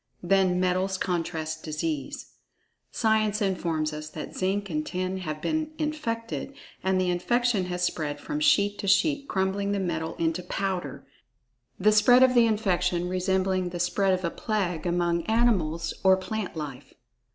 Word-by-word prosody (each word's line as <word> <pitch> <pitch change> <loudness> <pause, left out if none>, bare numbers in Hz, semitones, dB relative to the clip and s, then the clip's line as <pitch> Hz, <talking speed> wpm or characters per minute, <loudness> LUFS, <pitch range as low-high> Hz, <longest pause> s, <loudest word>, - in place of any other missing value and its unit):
Then 185 0 +3
metals 185 +1 +1
contract 160 -3 -2
disease. 155 -3 -4 0.6
Science 215 -2 +1
informs 165 -6 -1
us 155 0 -6
that 155 - -8
zinc 195 +2 -1
and 155 -4 -2
tin 185 +3 -3
have 155 -4 -5
been 315 0 -1
infected, 275 -5 -3 0.3
and 190 0 +2
the 180 -1 +1
infection 230 +2 +1
has 180 0 -3
spread 150 -4 -2
from 300 - -4
sheet 205 -10 +3
to 200 - -4
sheet 280 +9 +3
crumbling 195 +1 0
the 200 - 0
metal 165 -3 -2
into 165 +2 -1
powder—the 180 - -4
spread 245 +4 +6
of 260 -1 +5
the 240 -2 +5
infection 180 -5 0
resembling 185 0 0
the 175 0 -6
spread 190 +2 +2
of 185 0 -4
a 170 - -1
plague 180 -7 -2
among 170 -1 +1
animals 190 -8 +1
or 190 -1 +6
plant 190 +1 -4
life. 145 -5 -7
185 Hz, 150 wpm, -27 LUFS, 170-210 Hz, 0.6 s, spread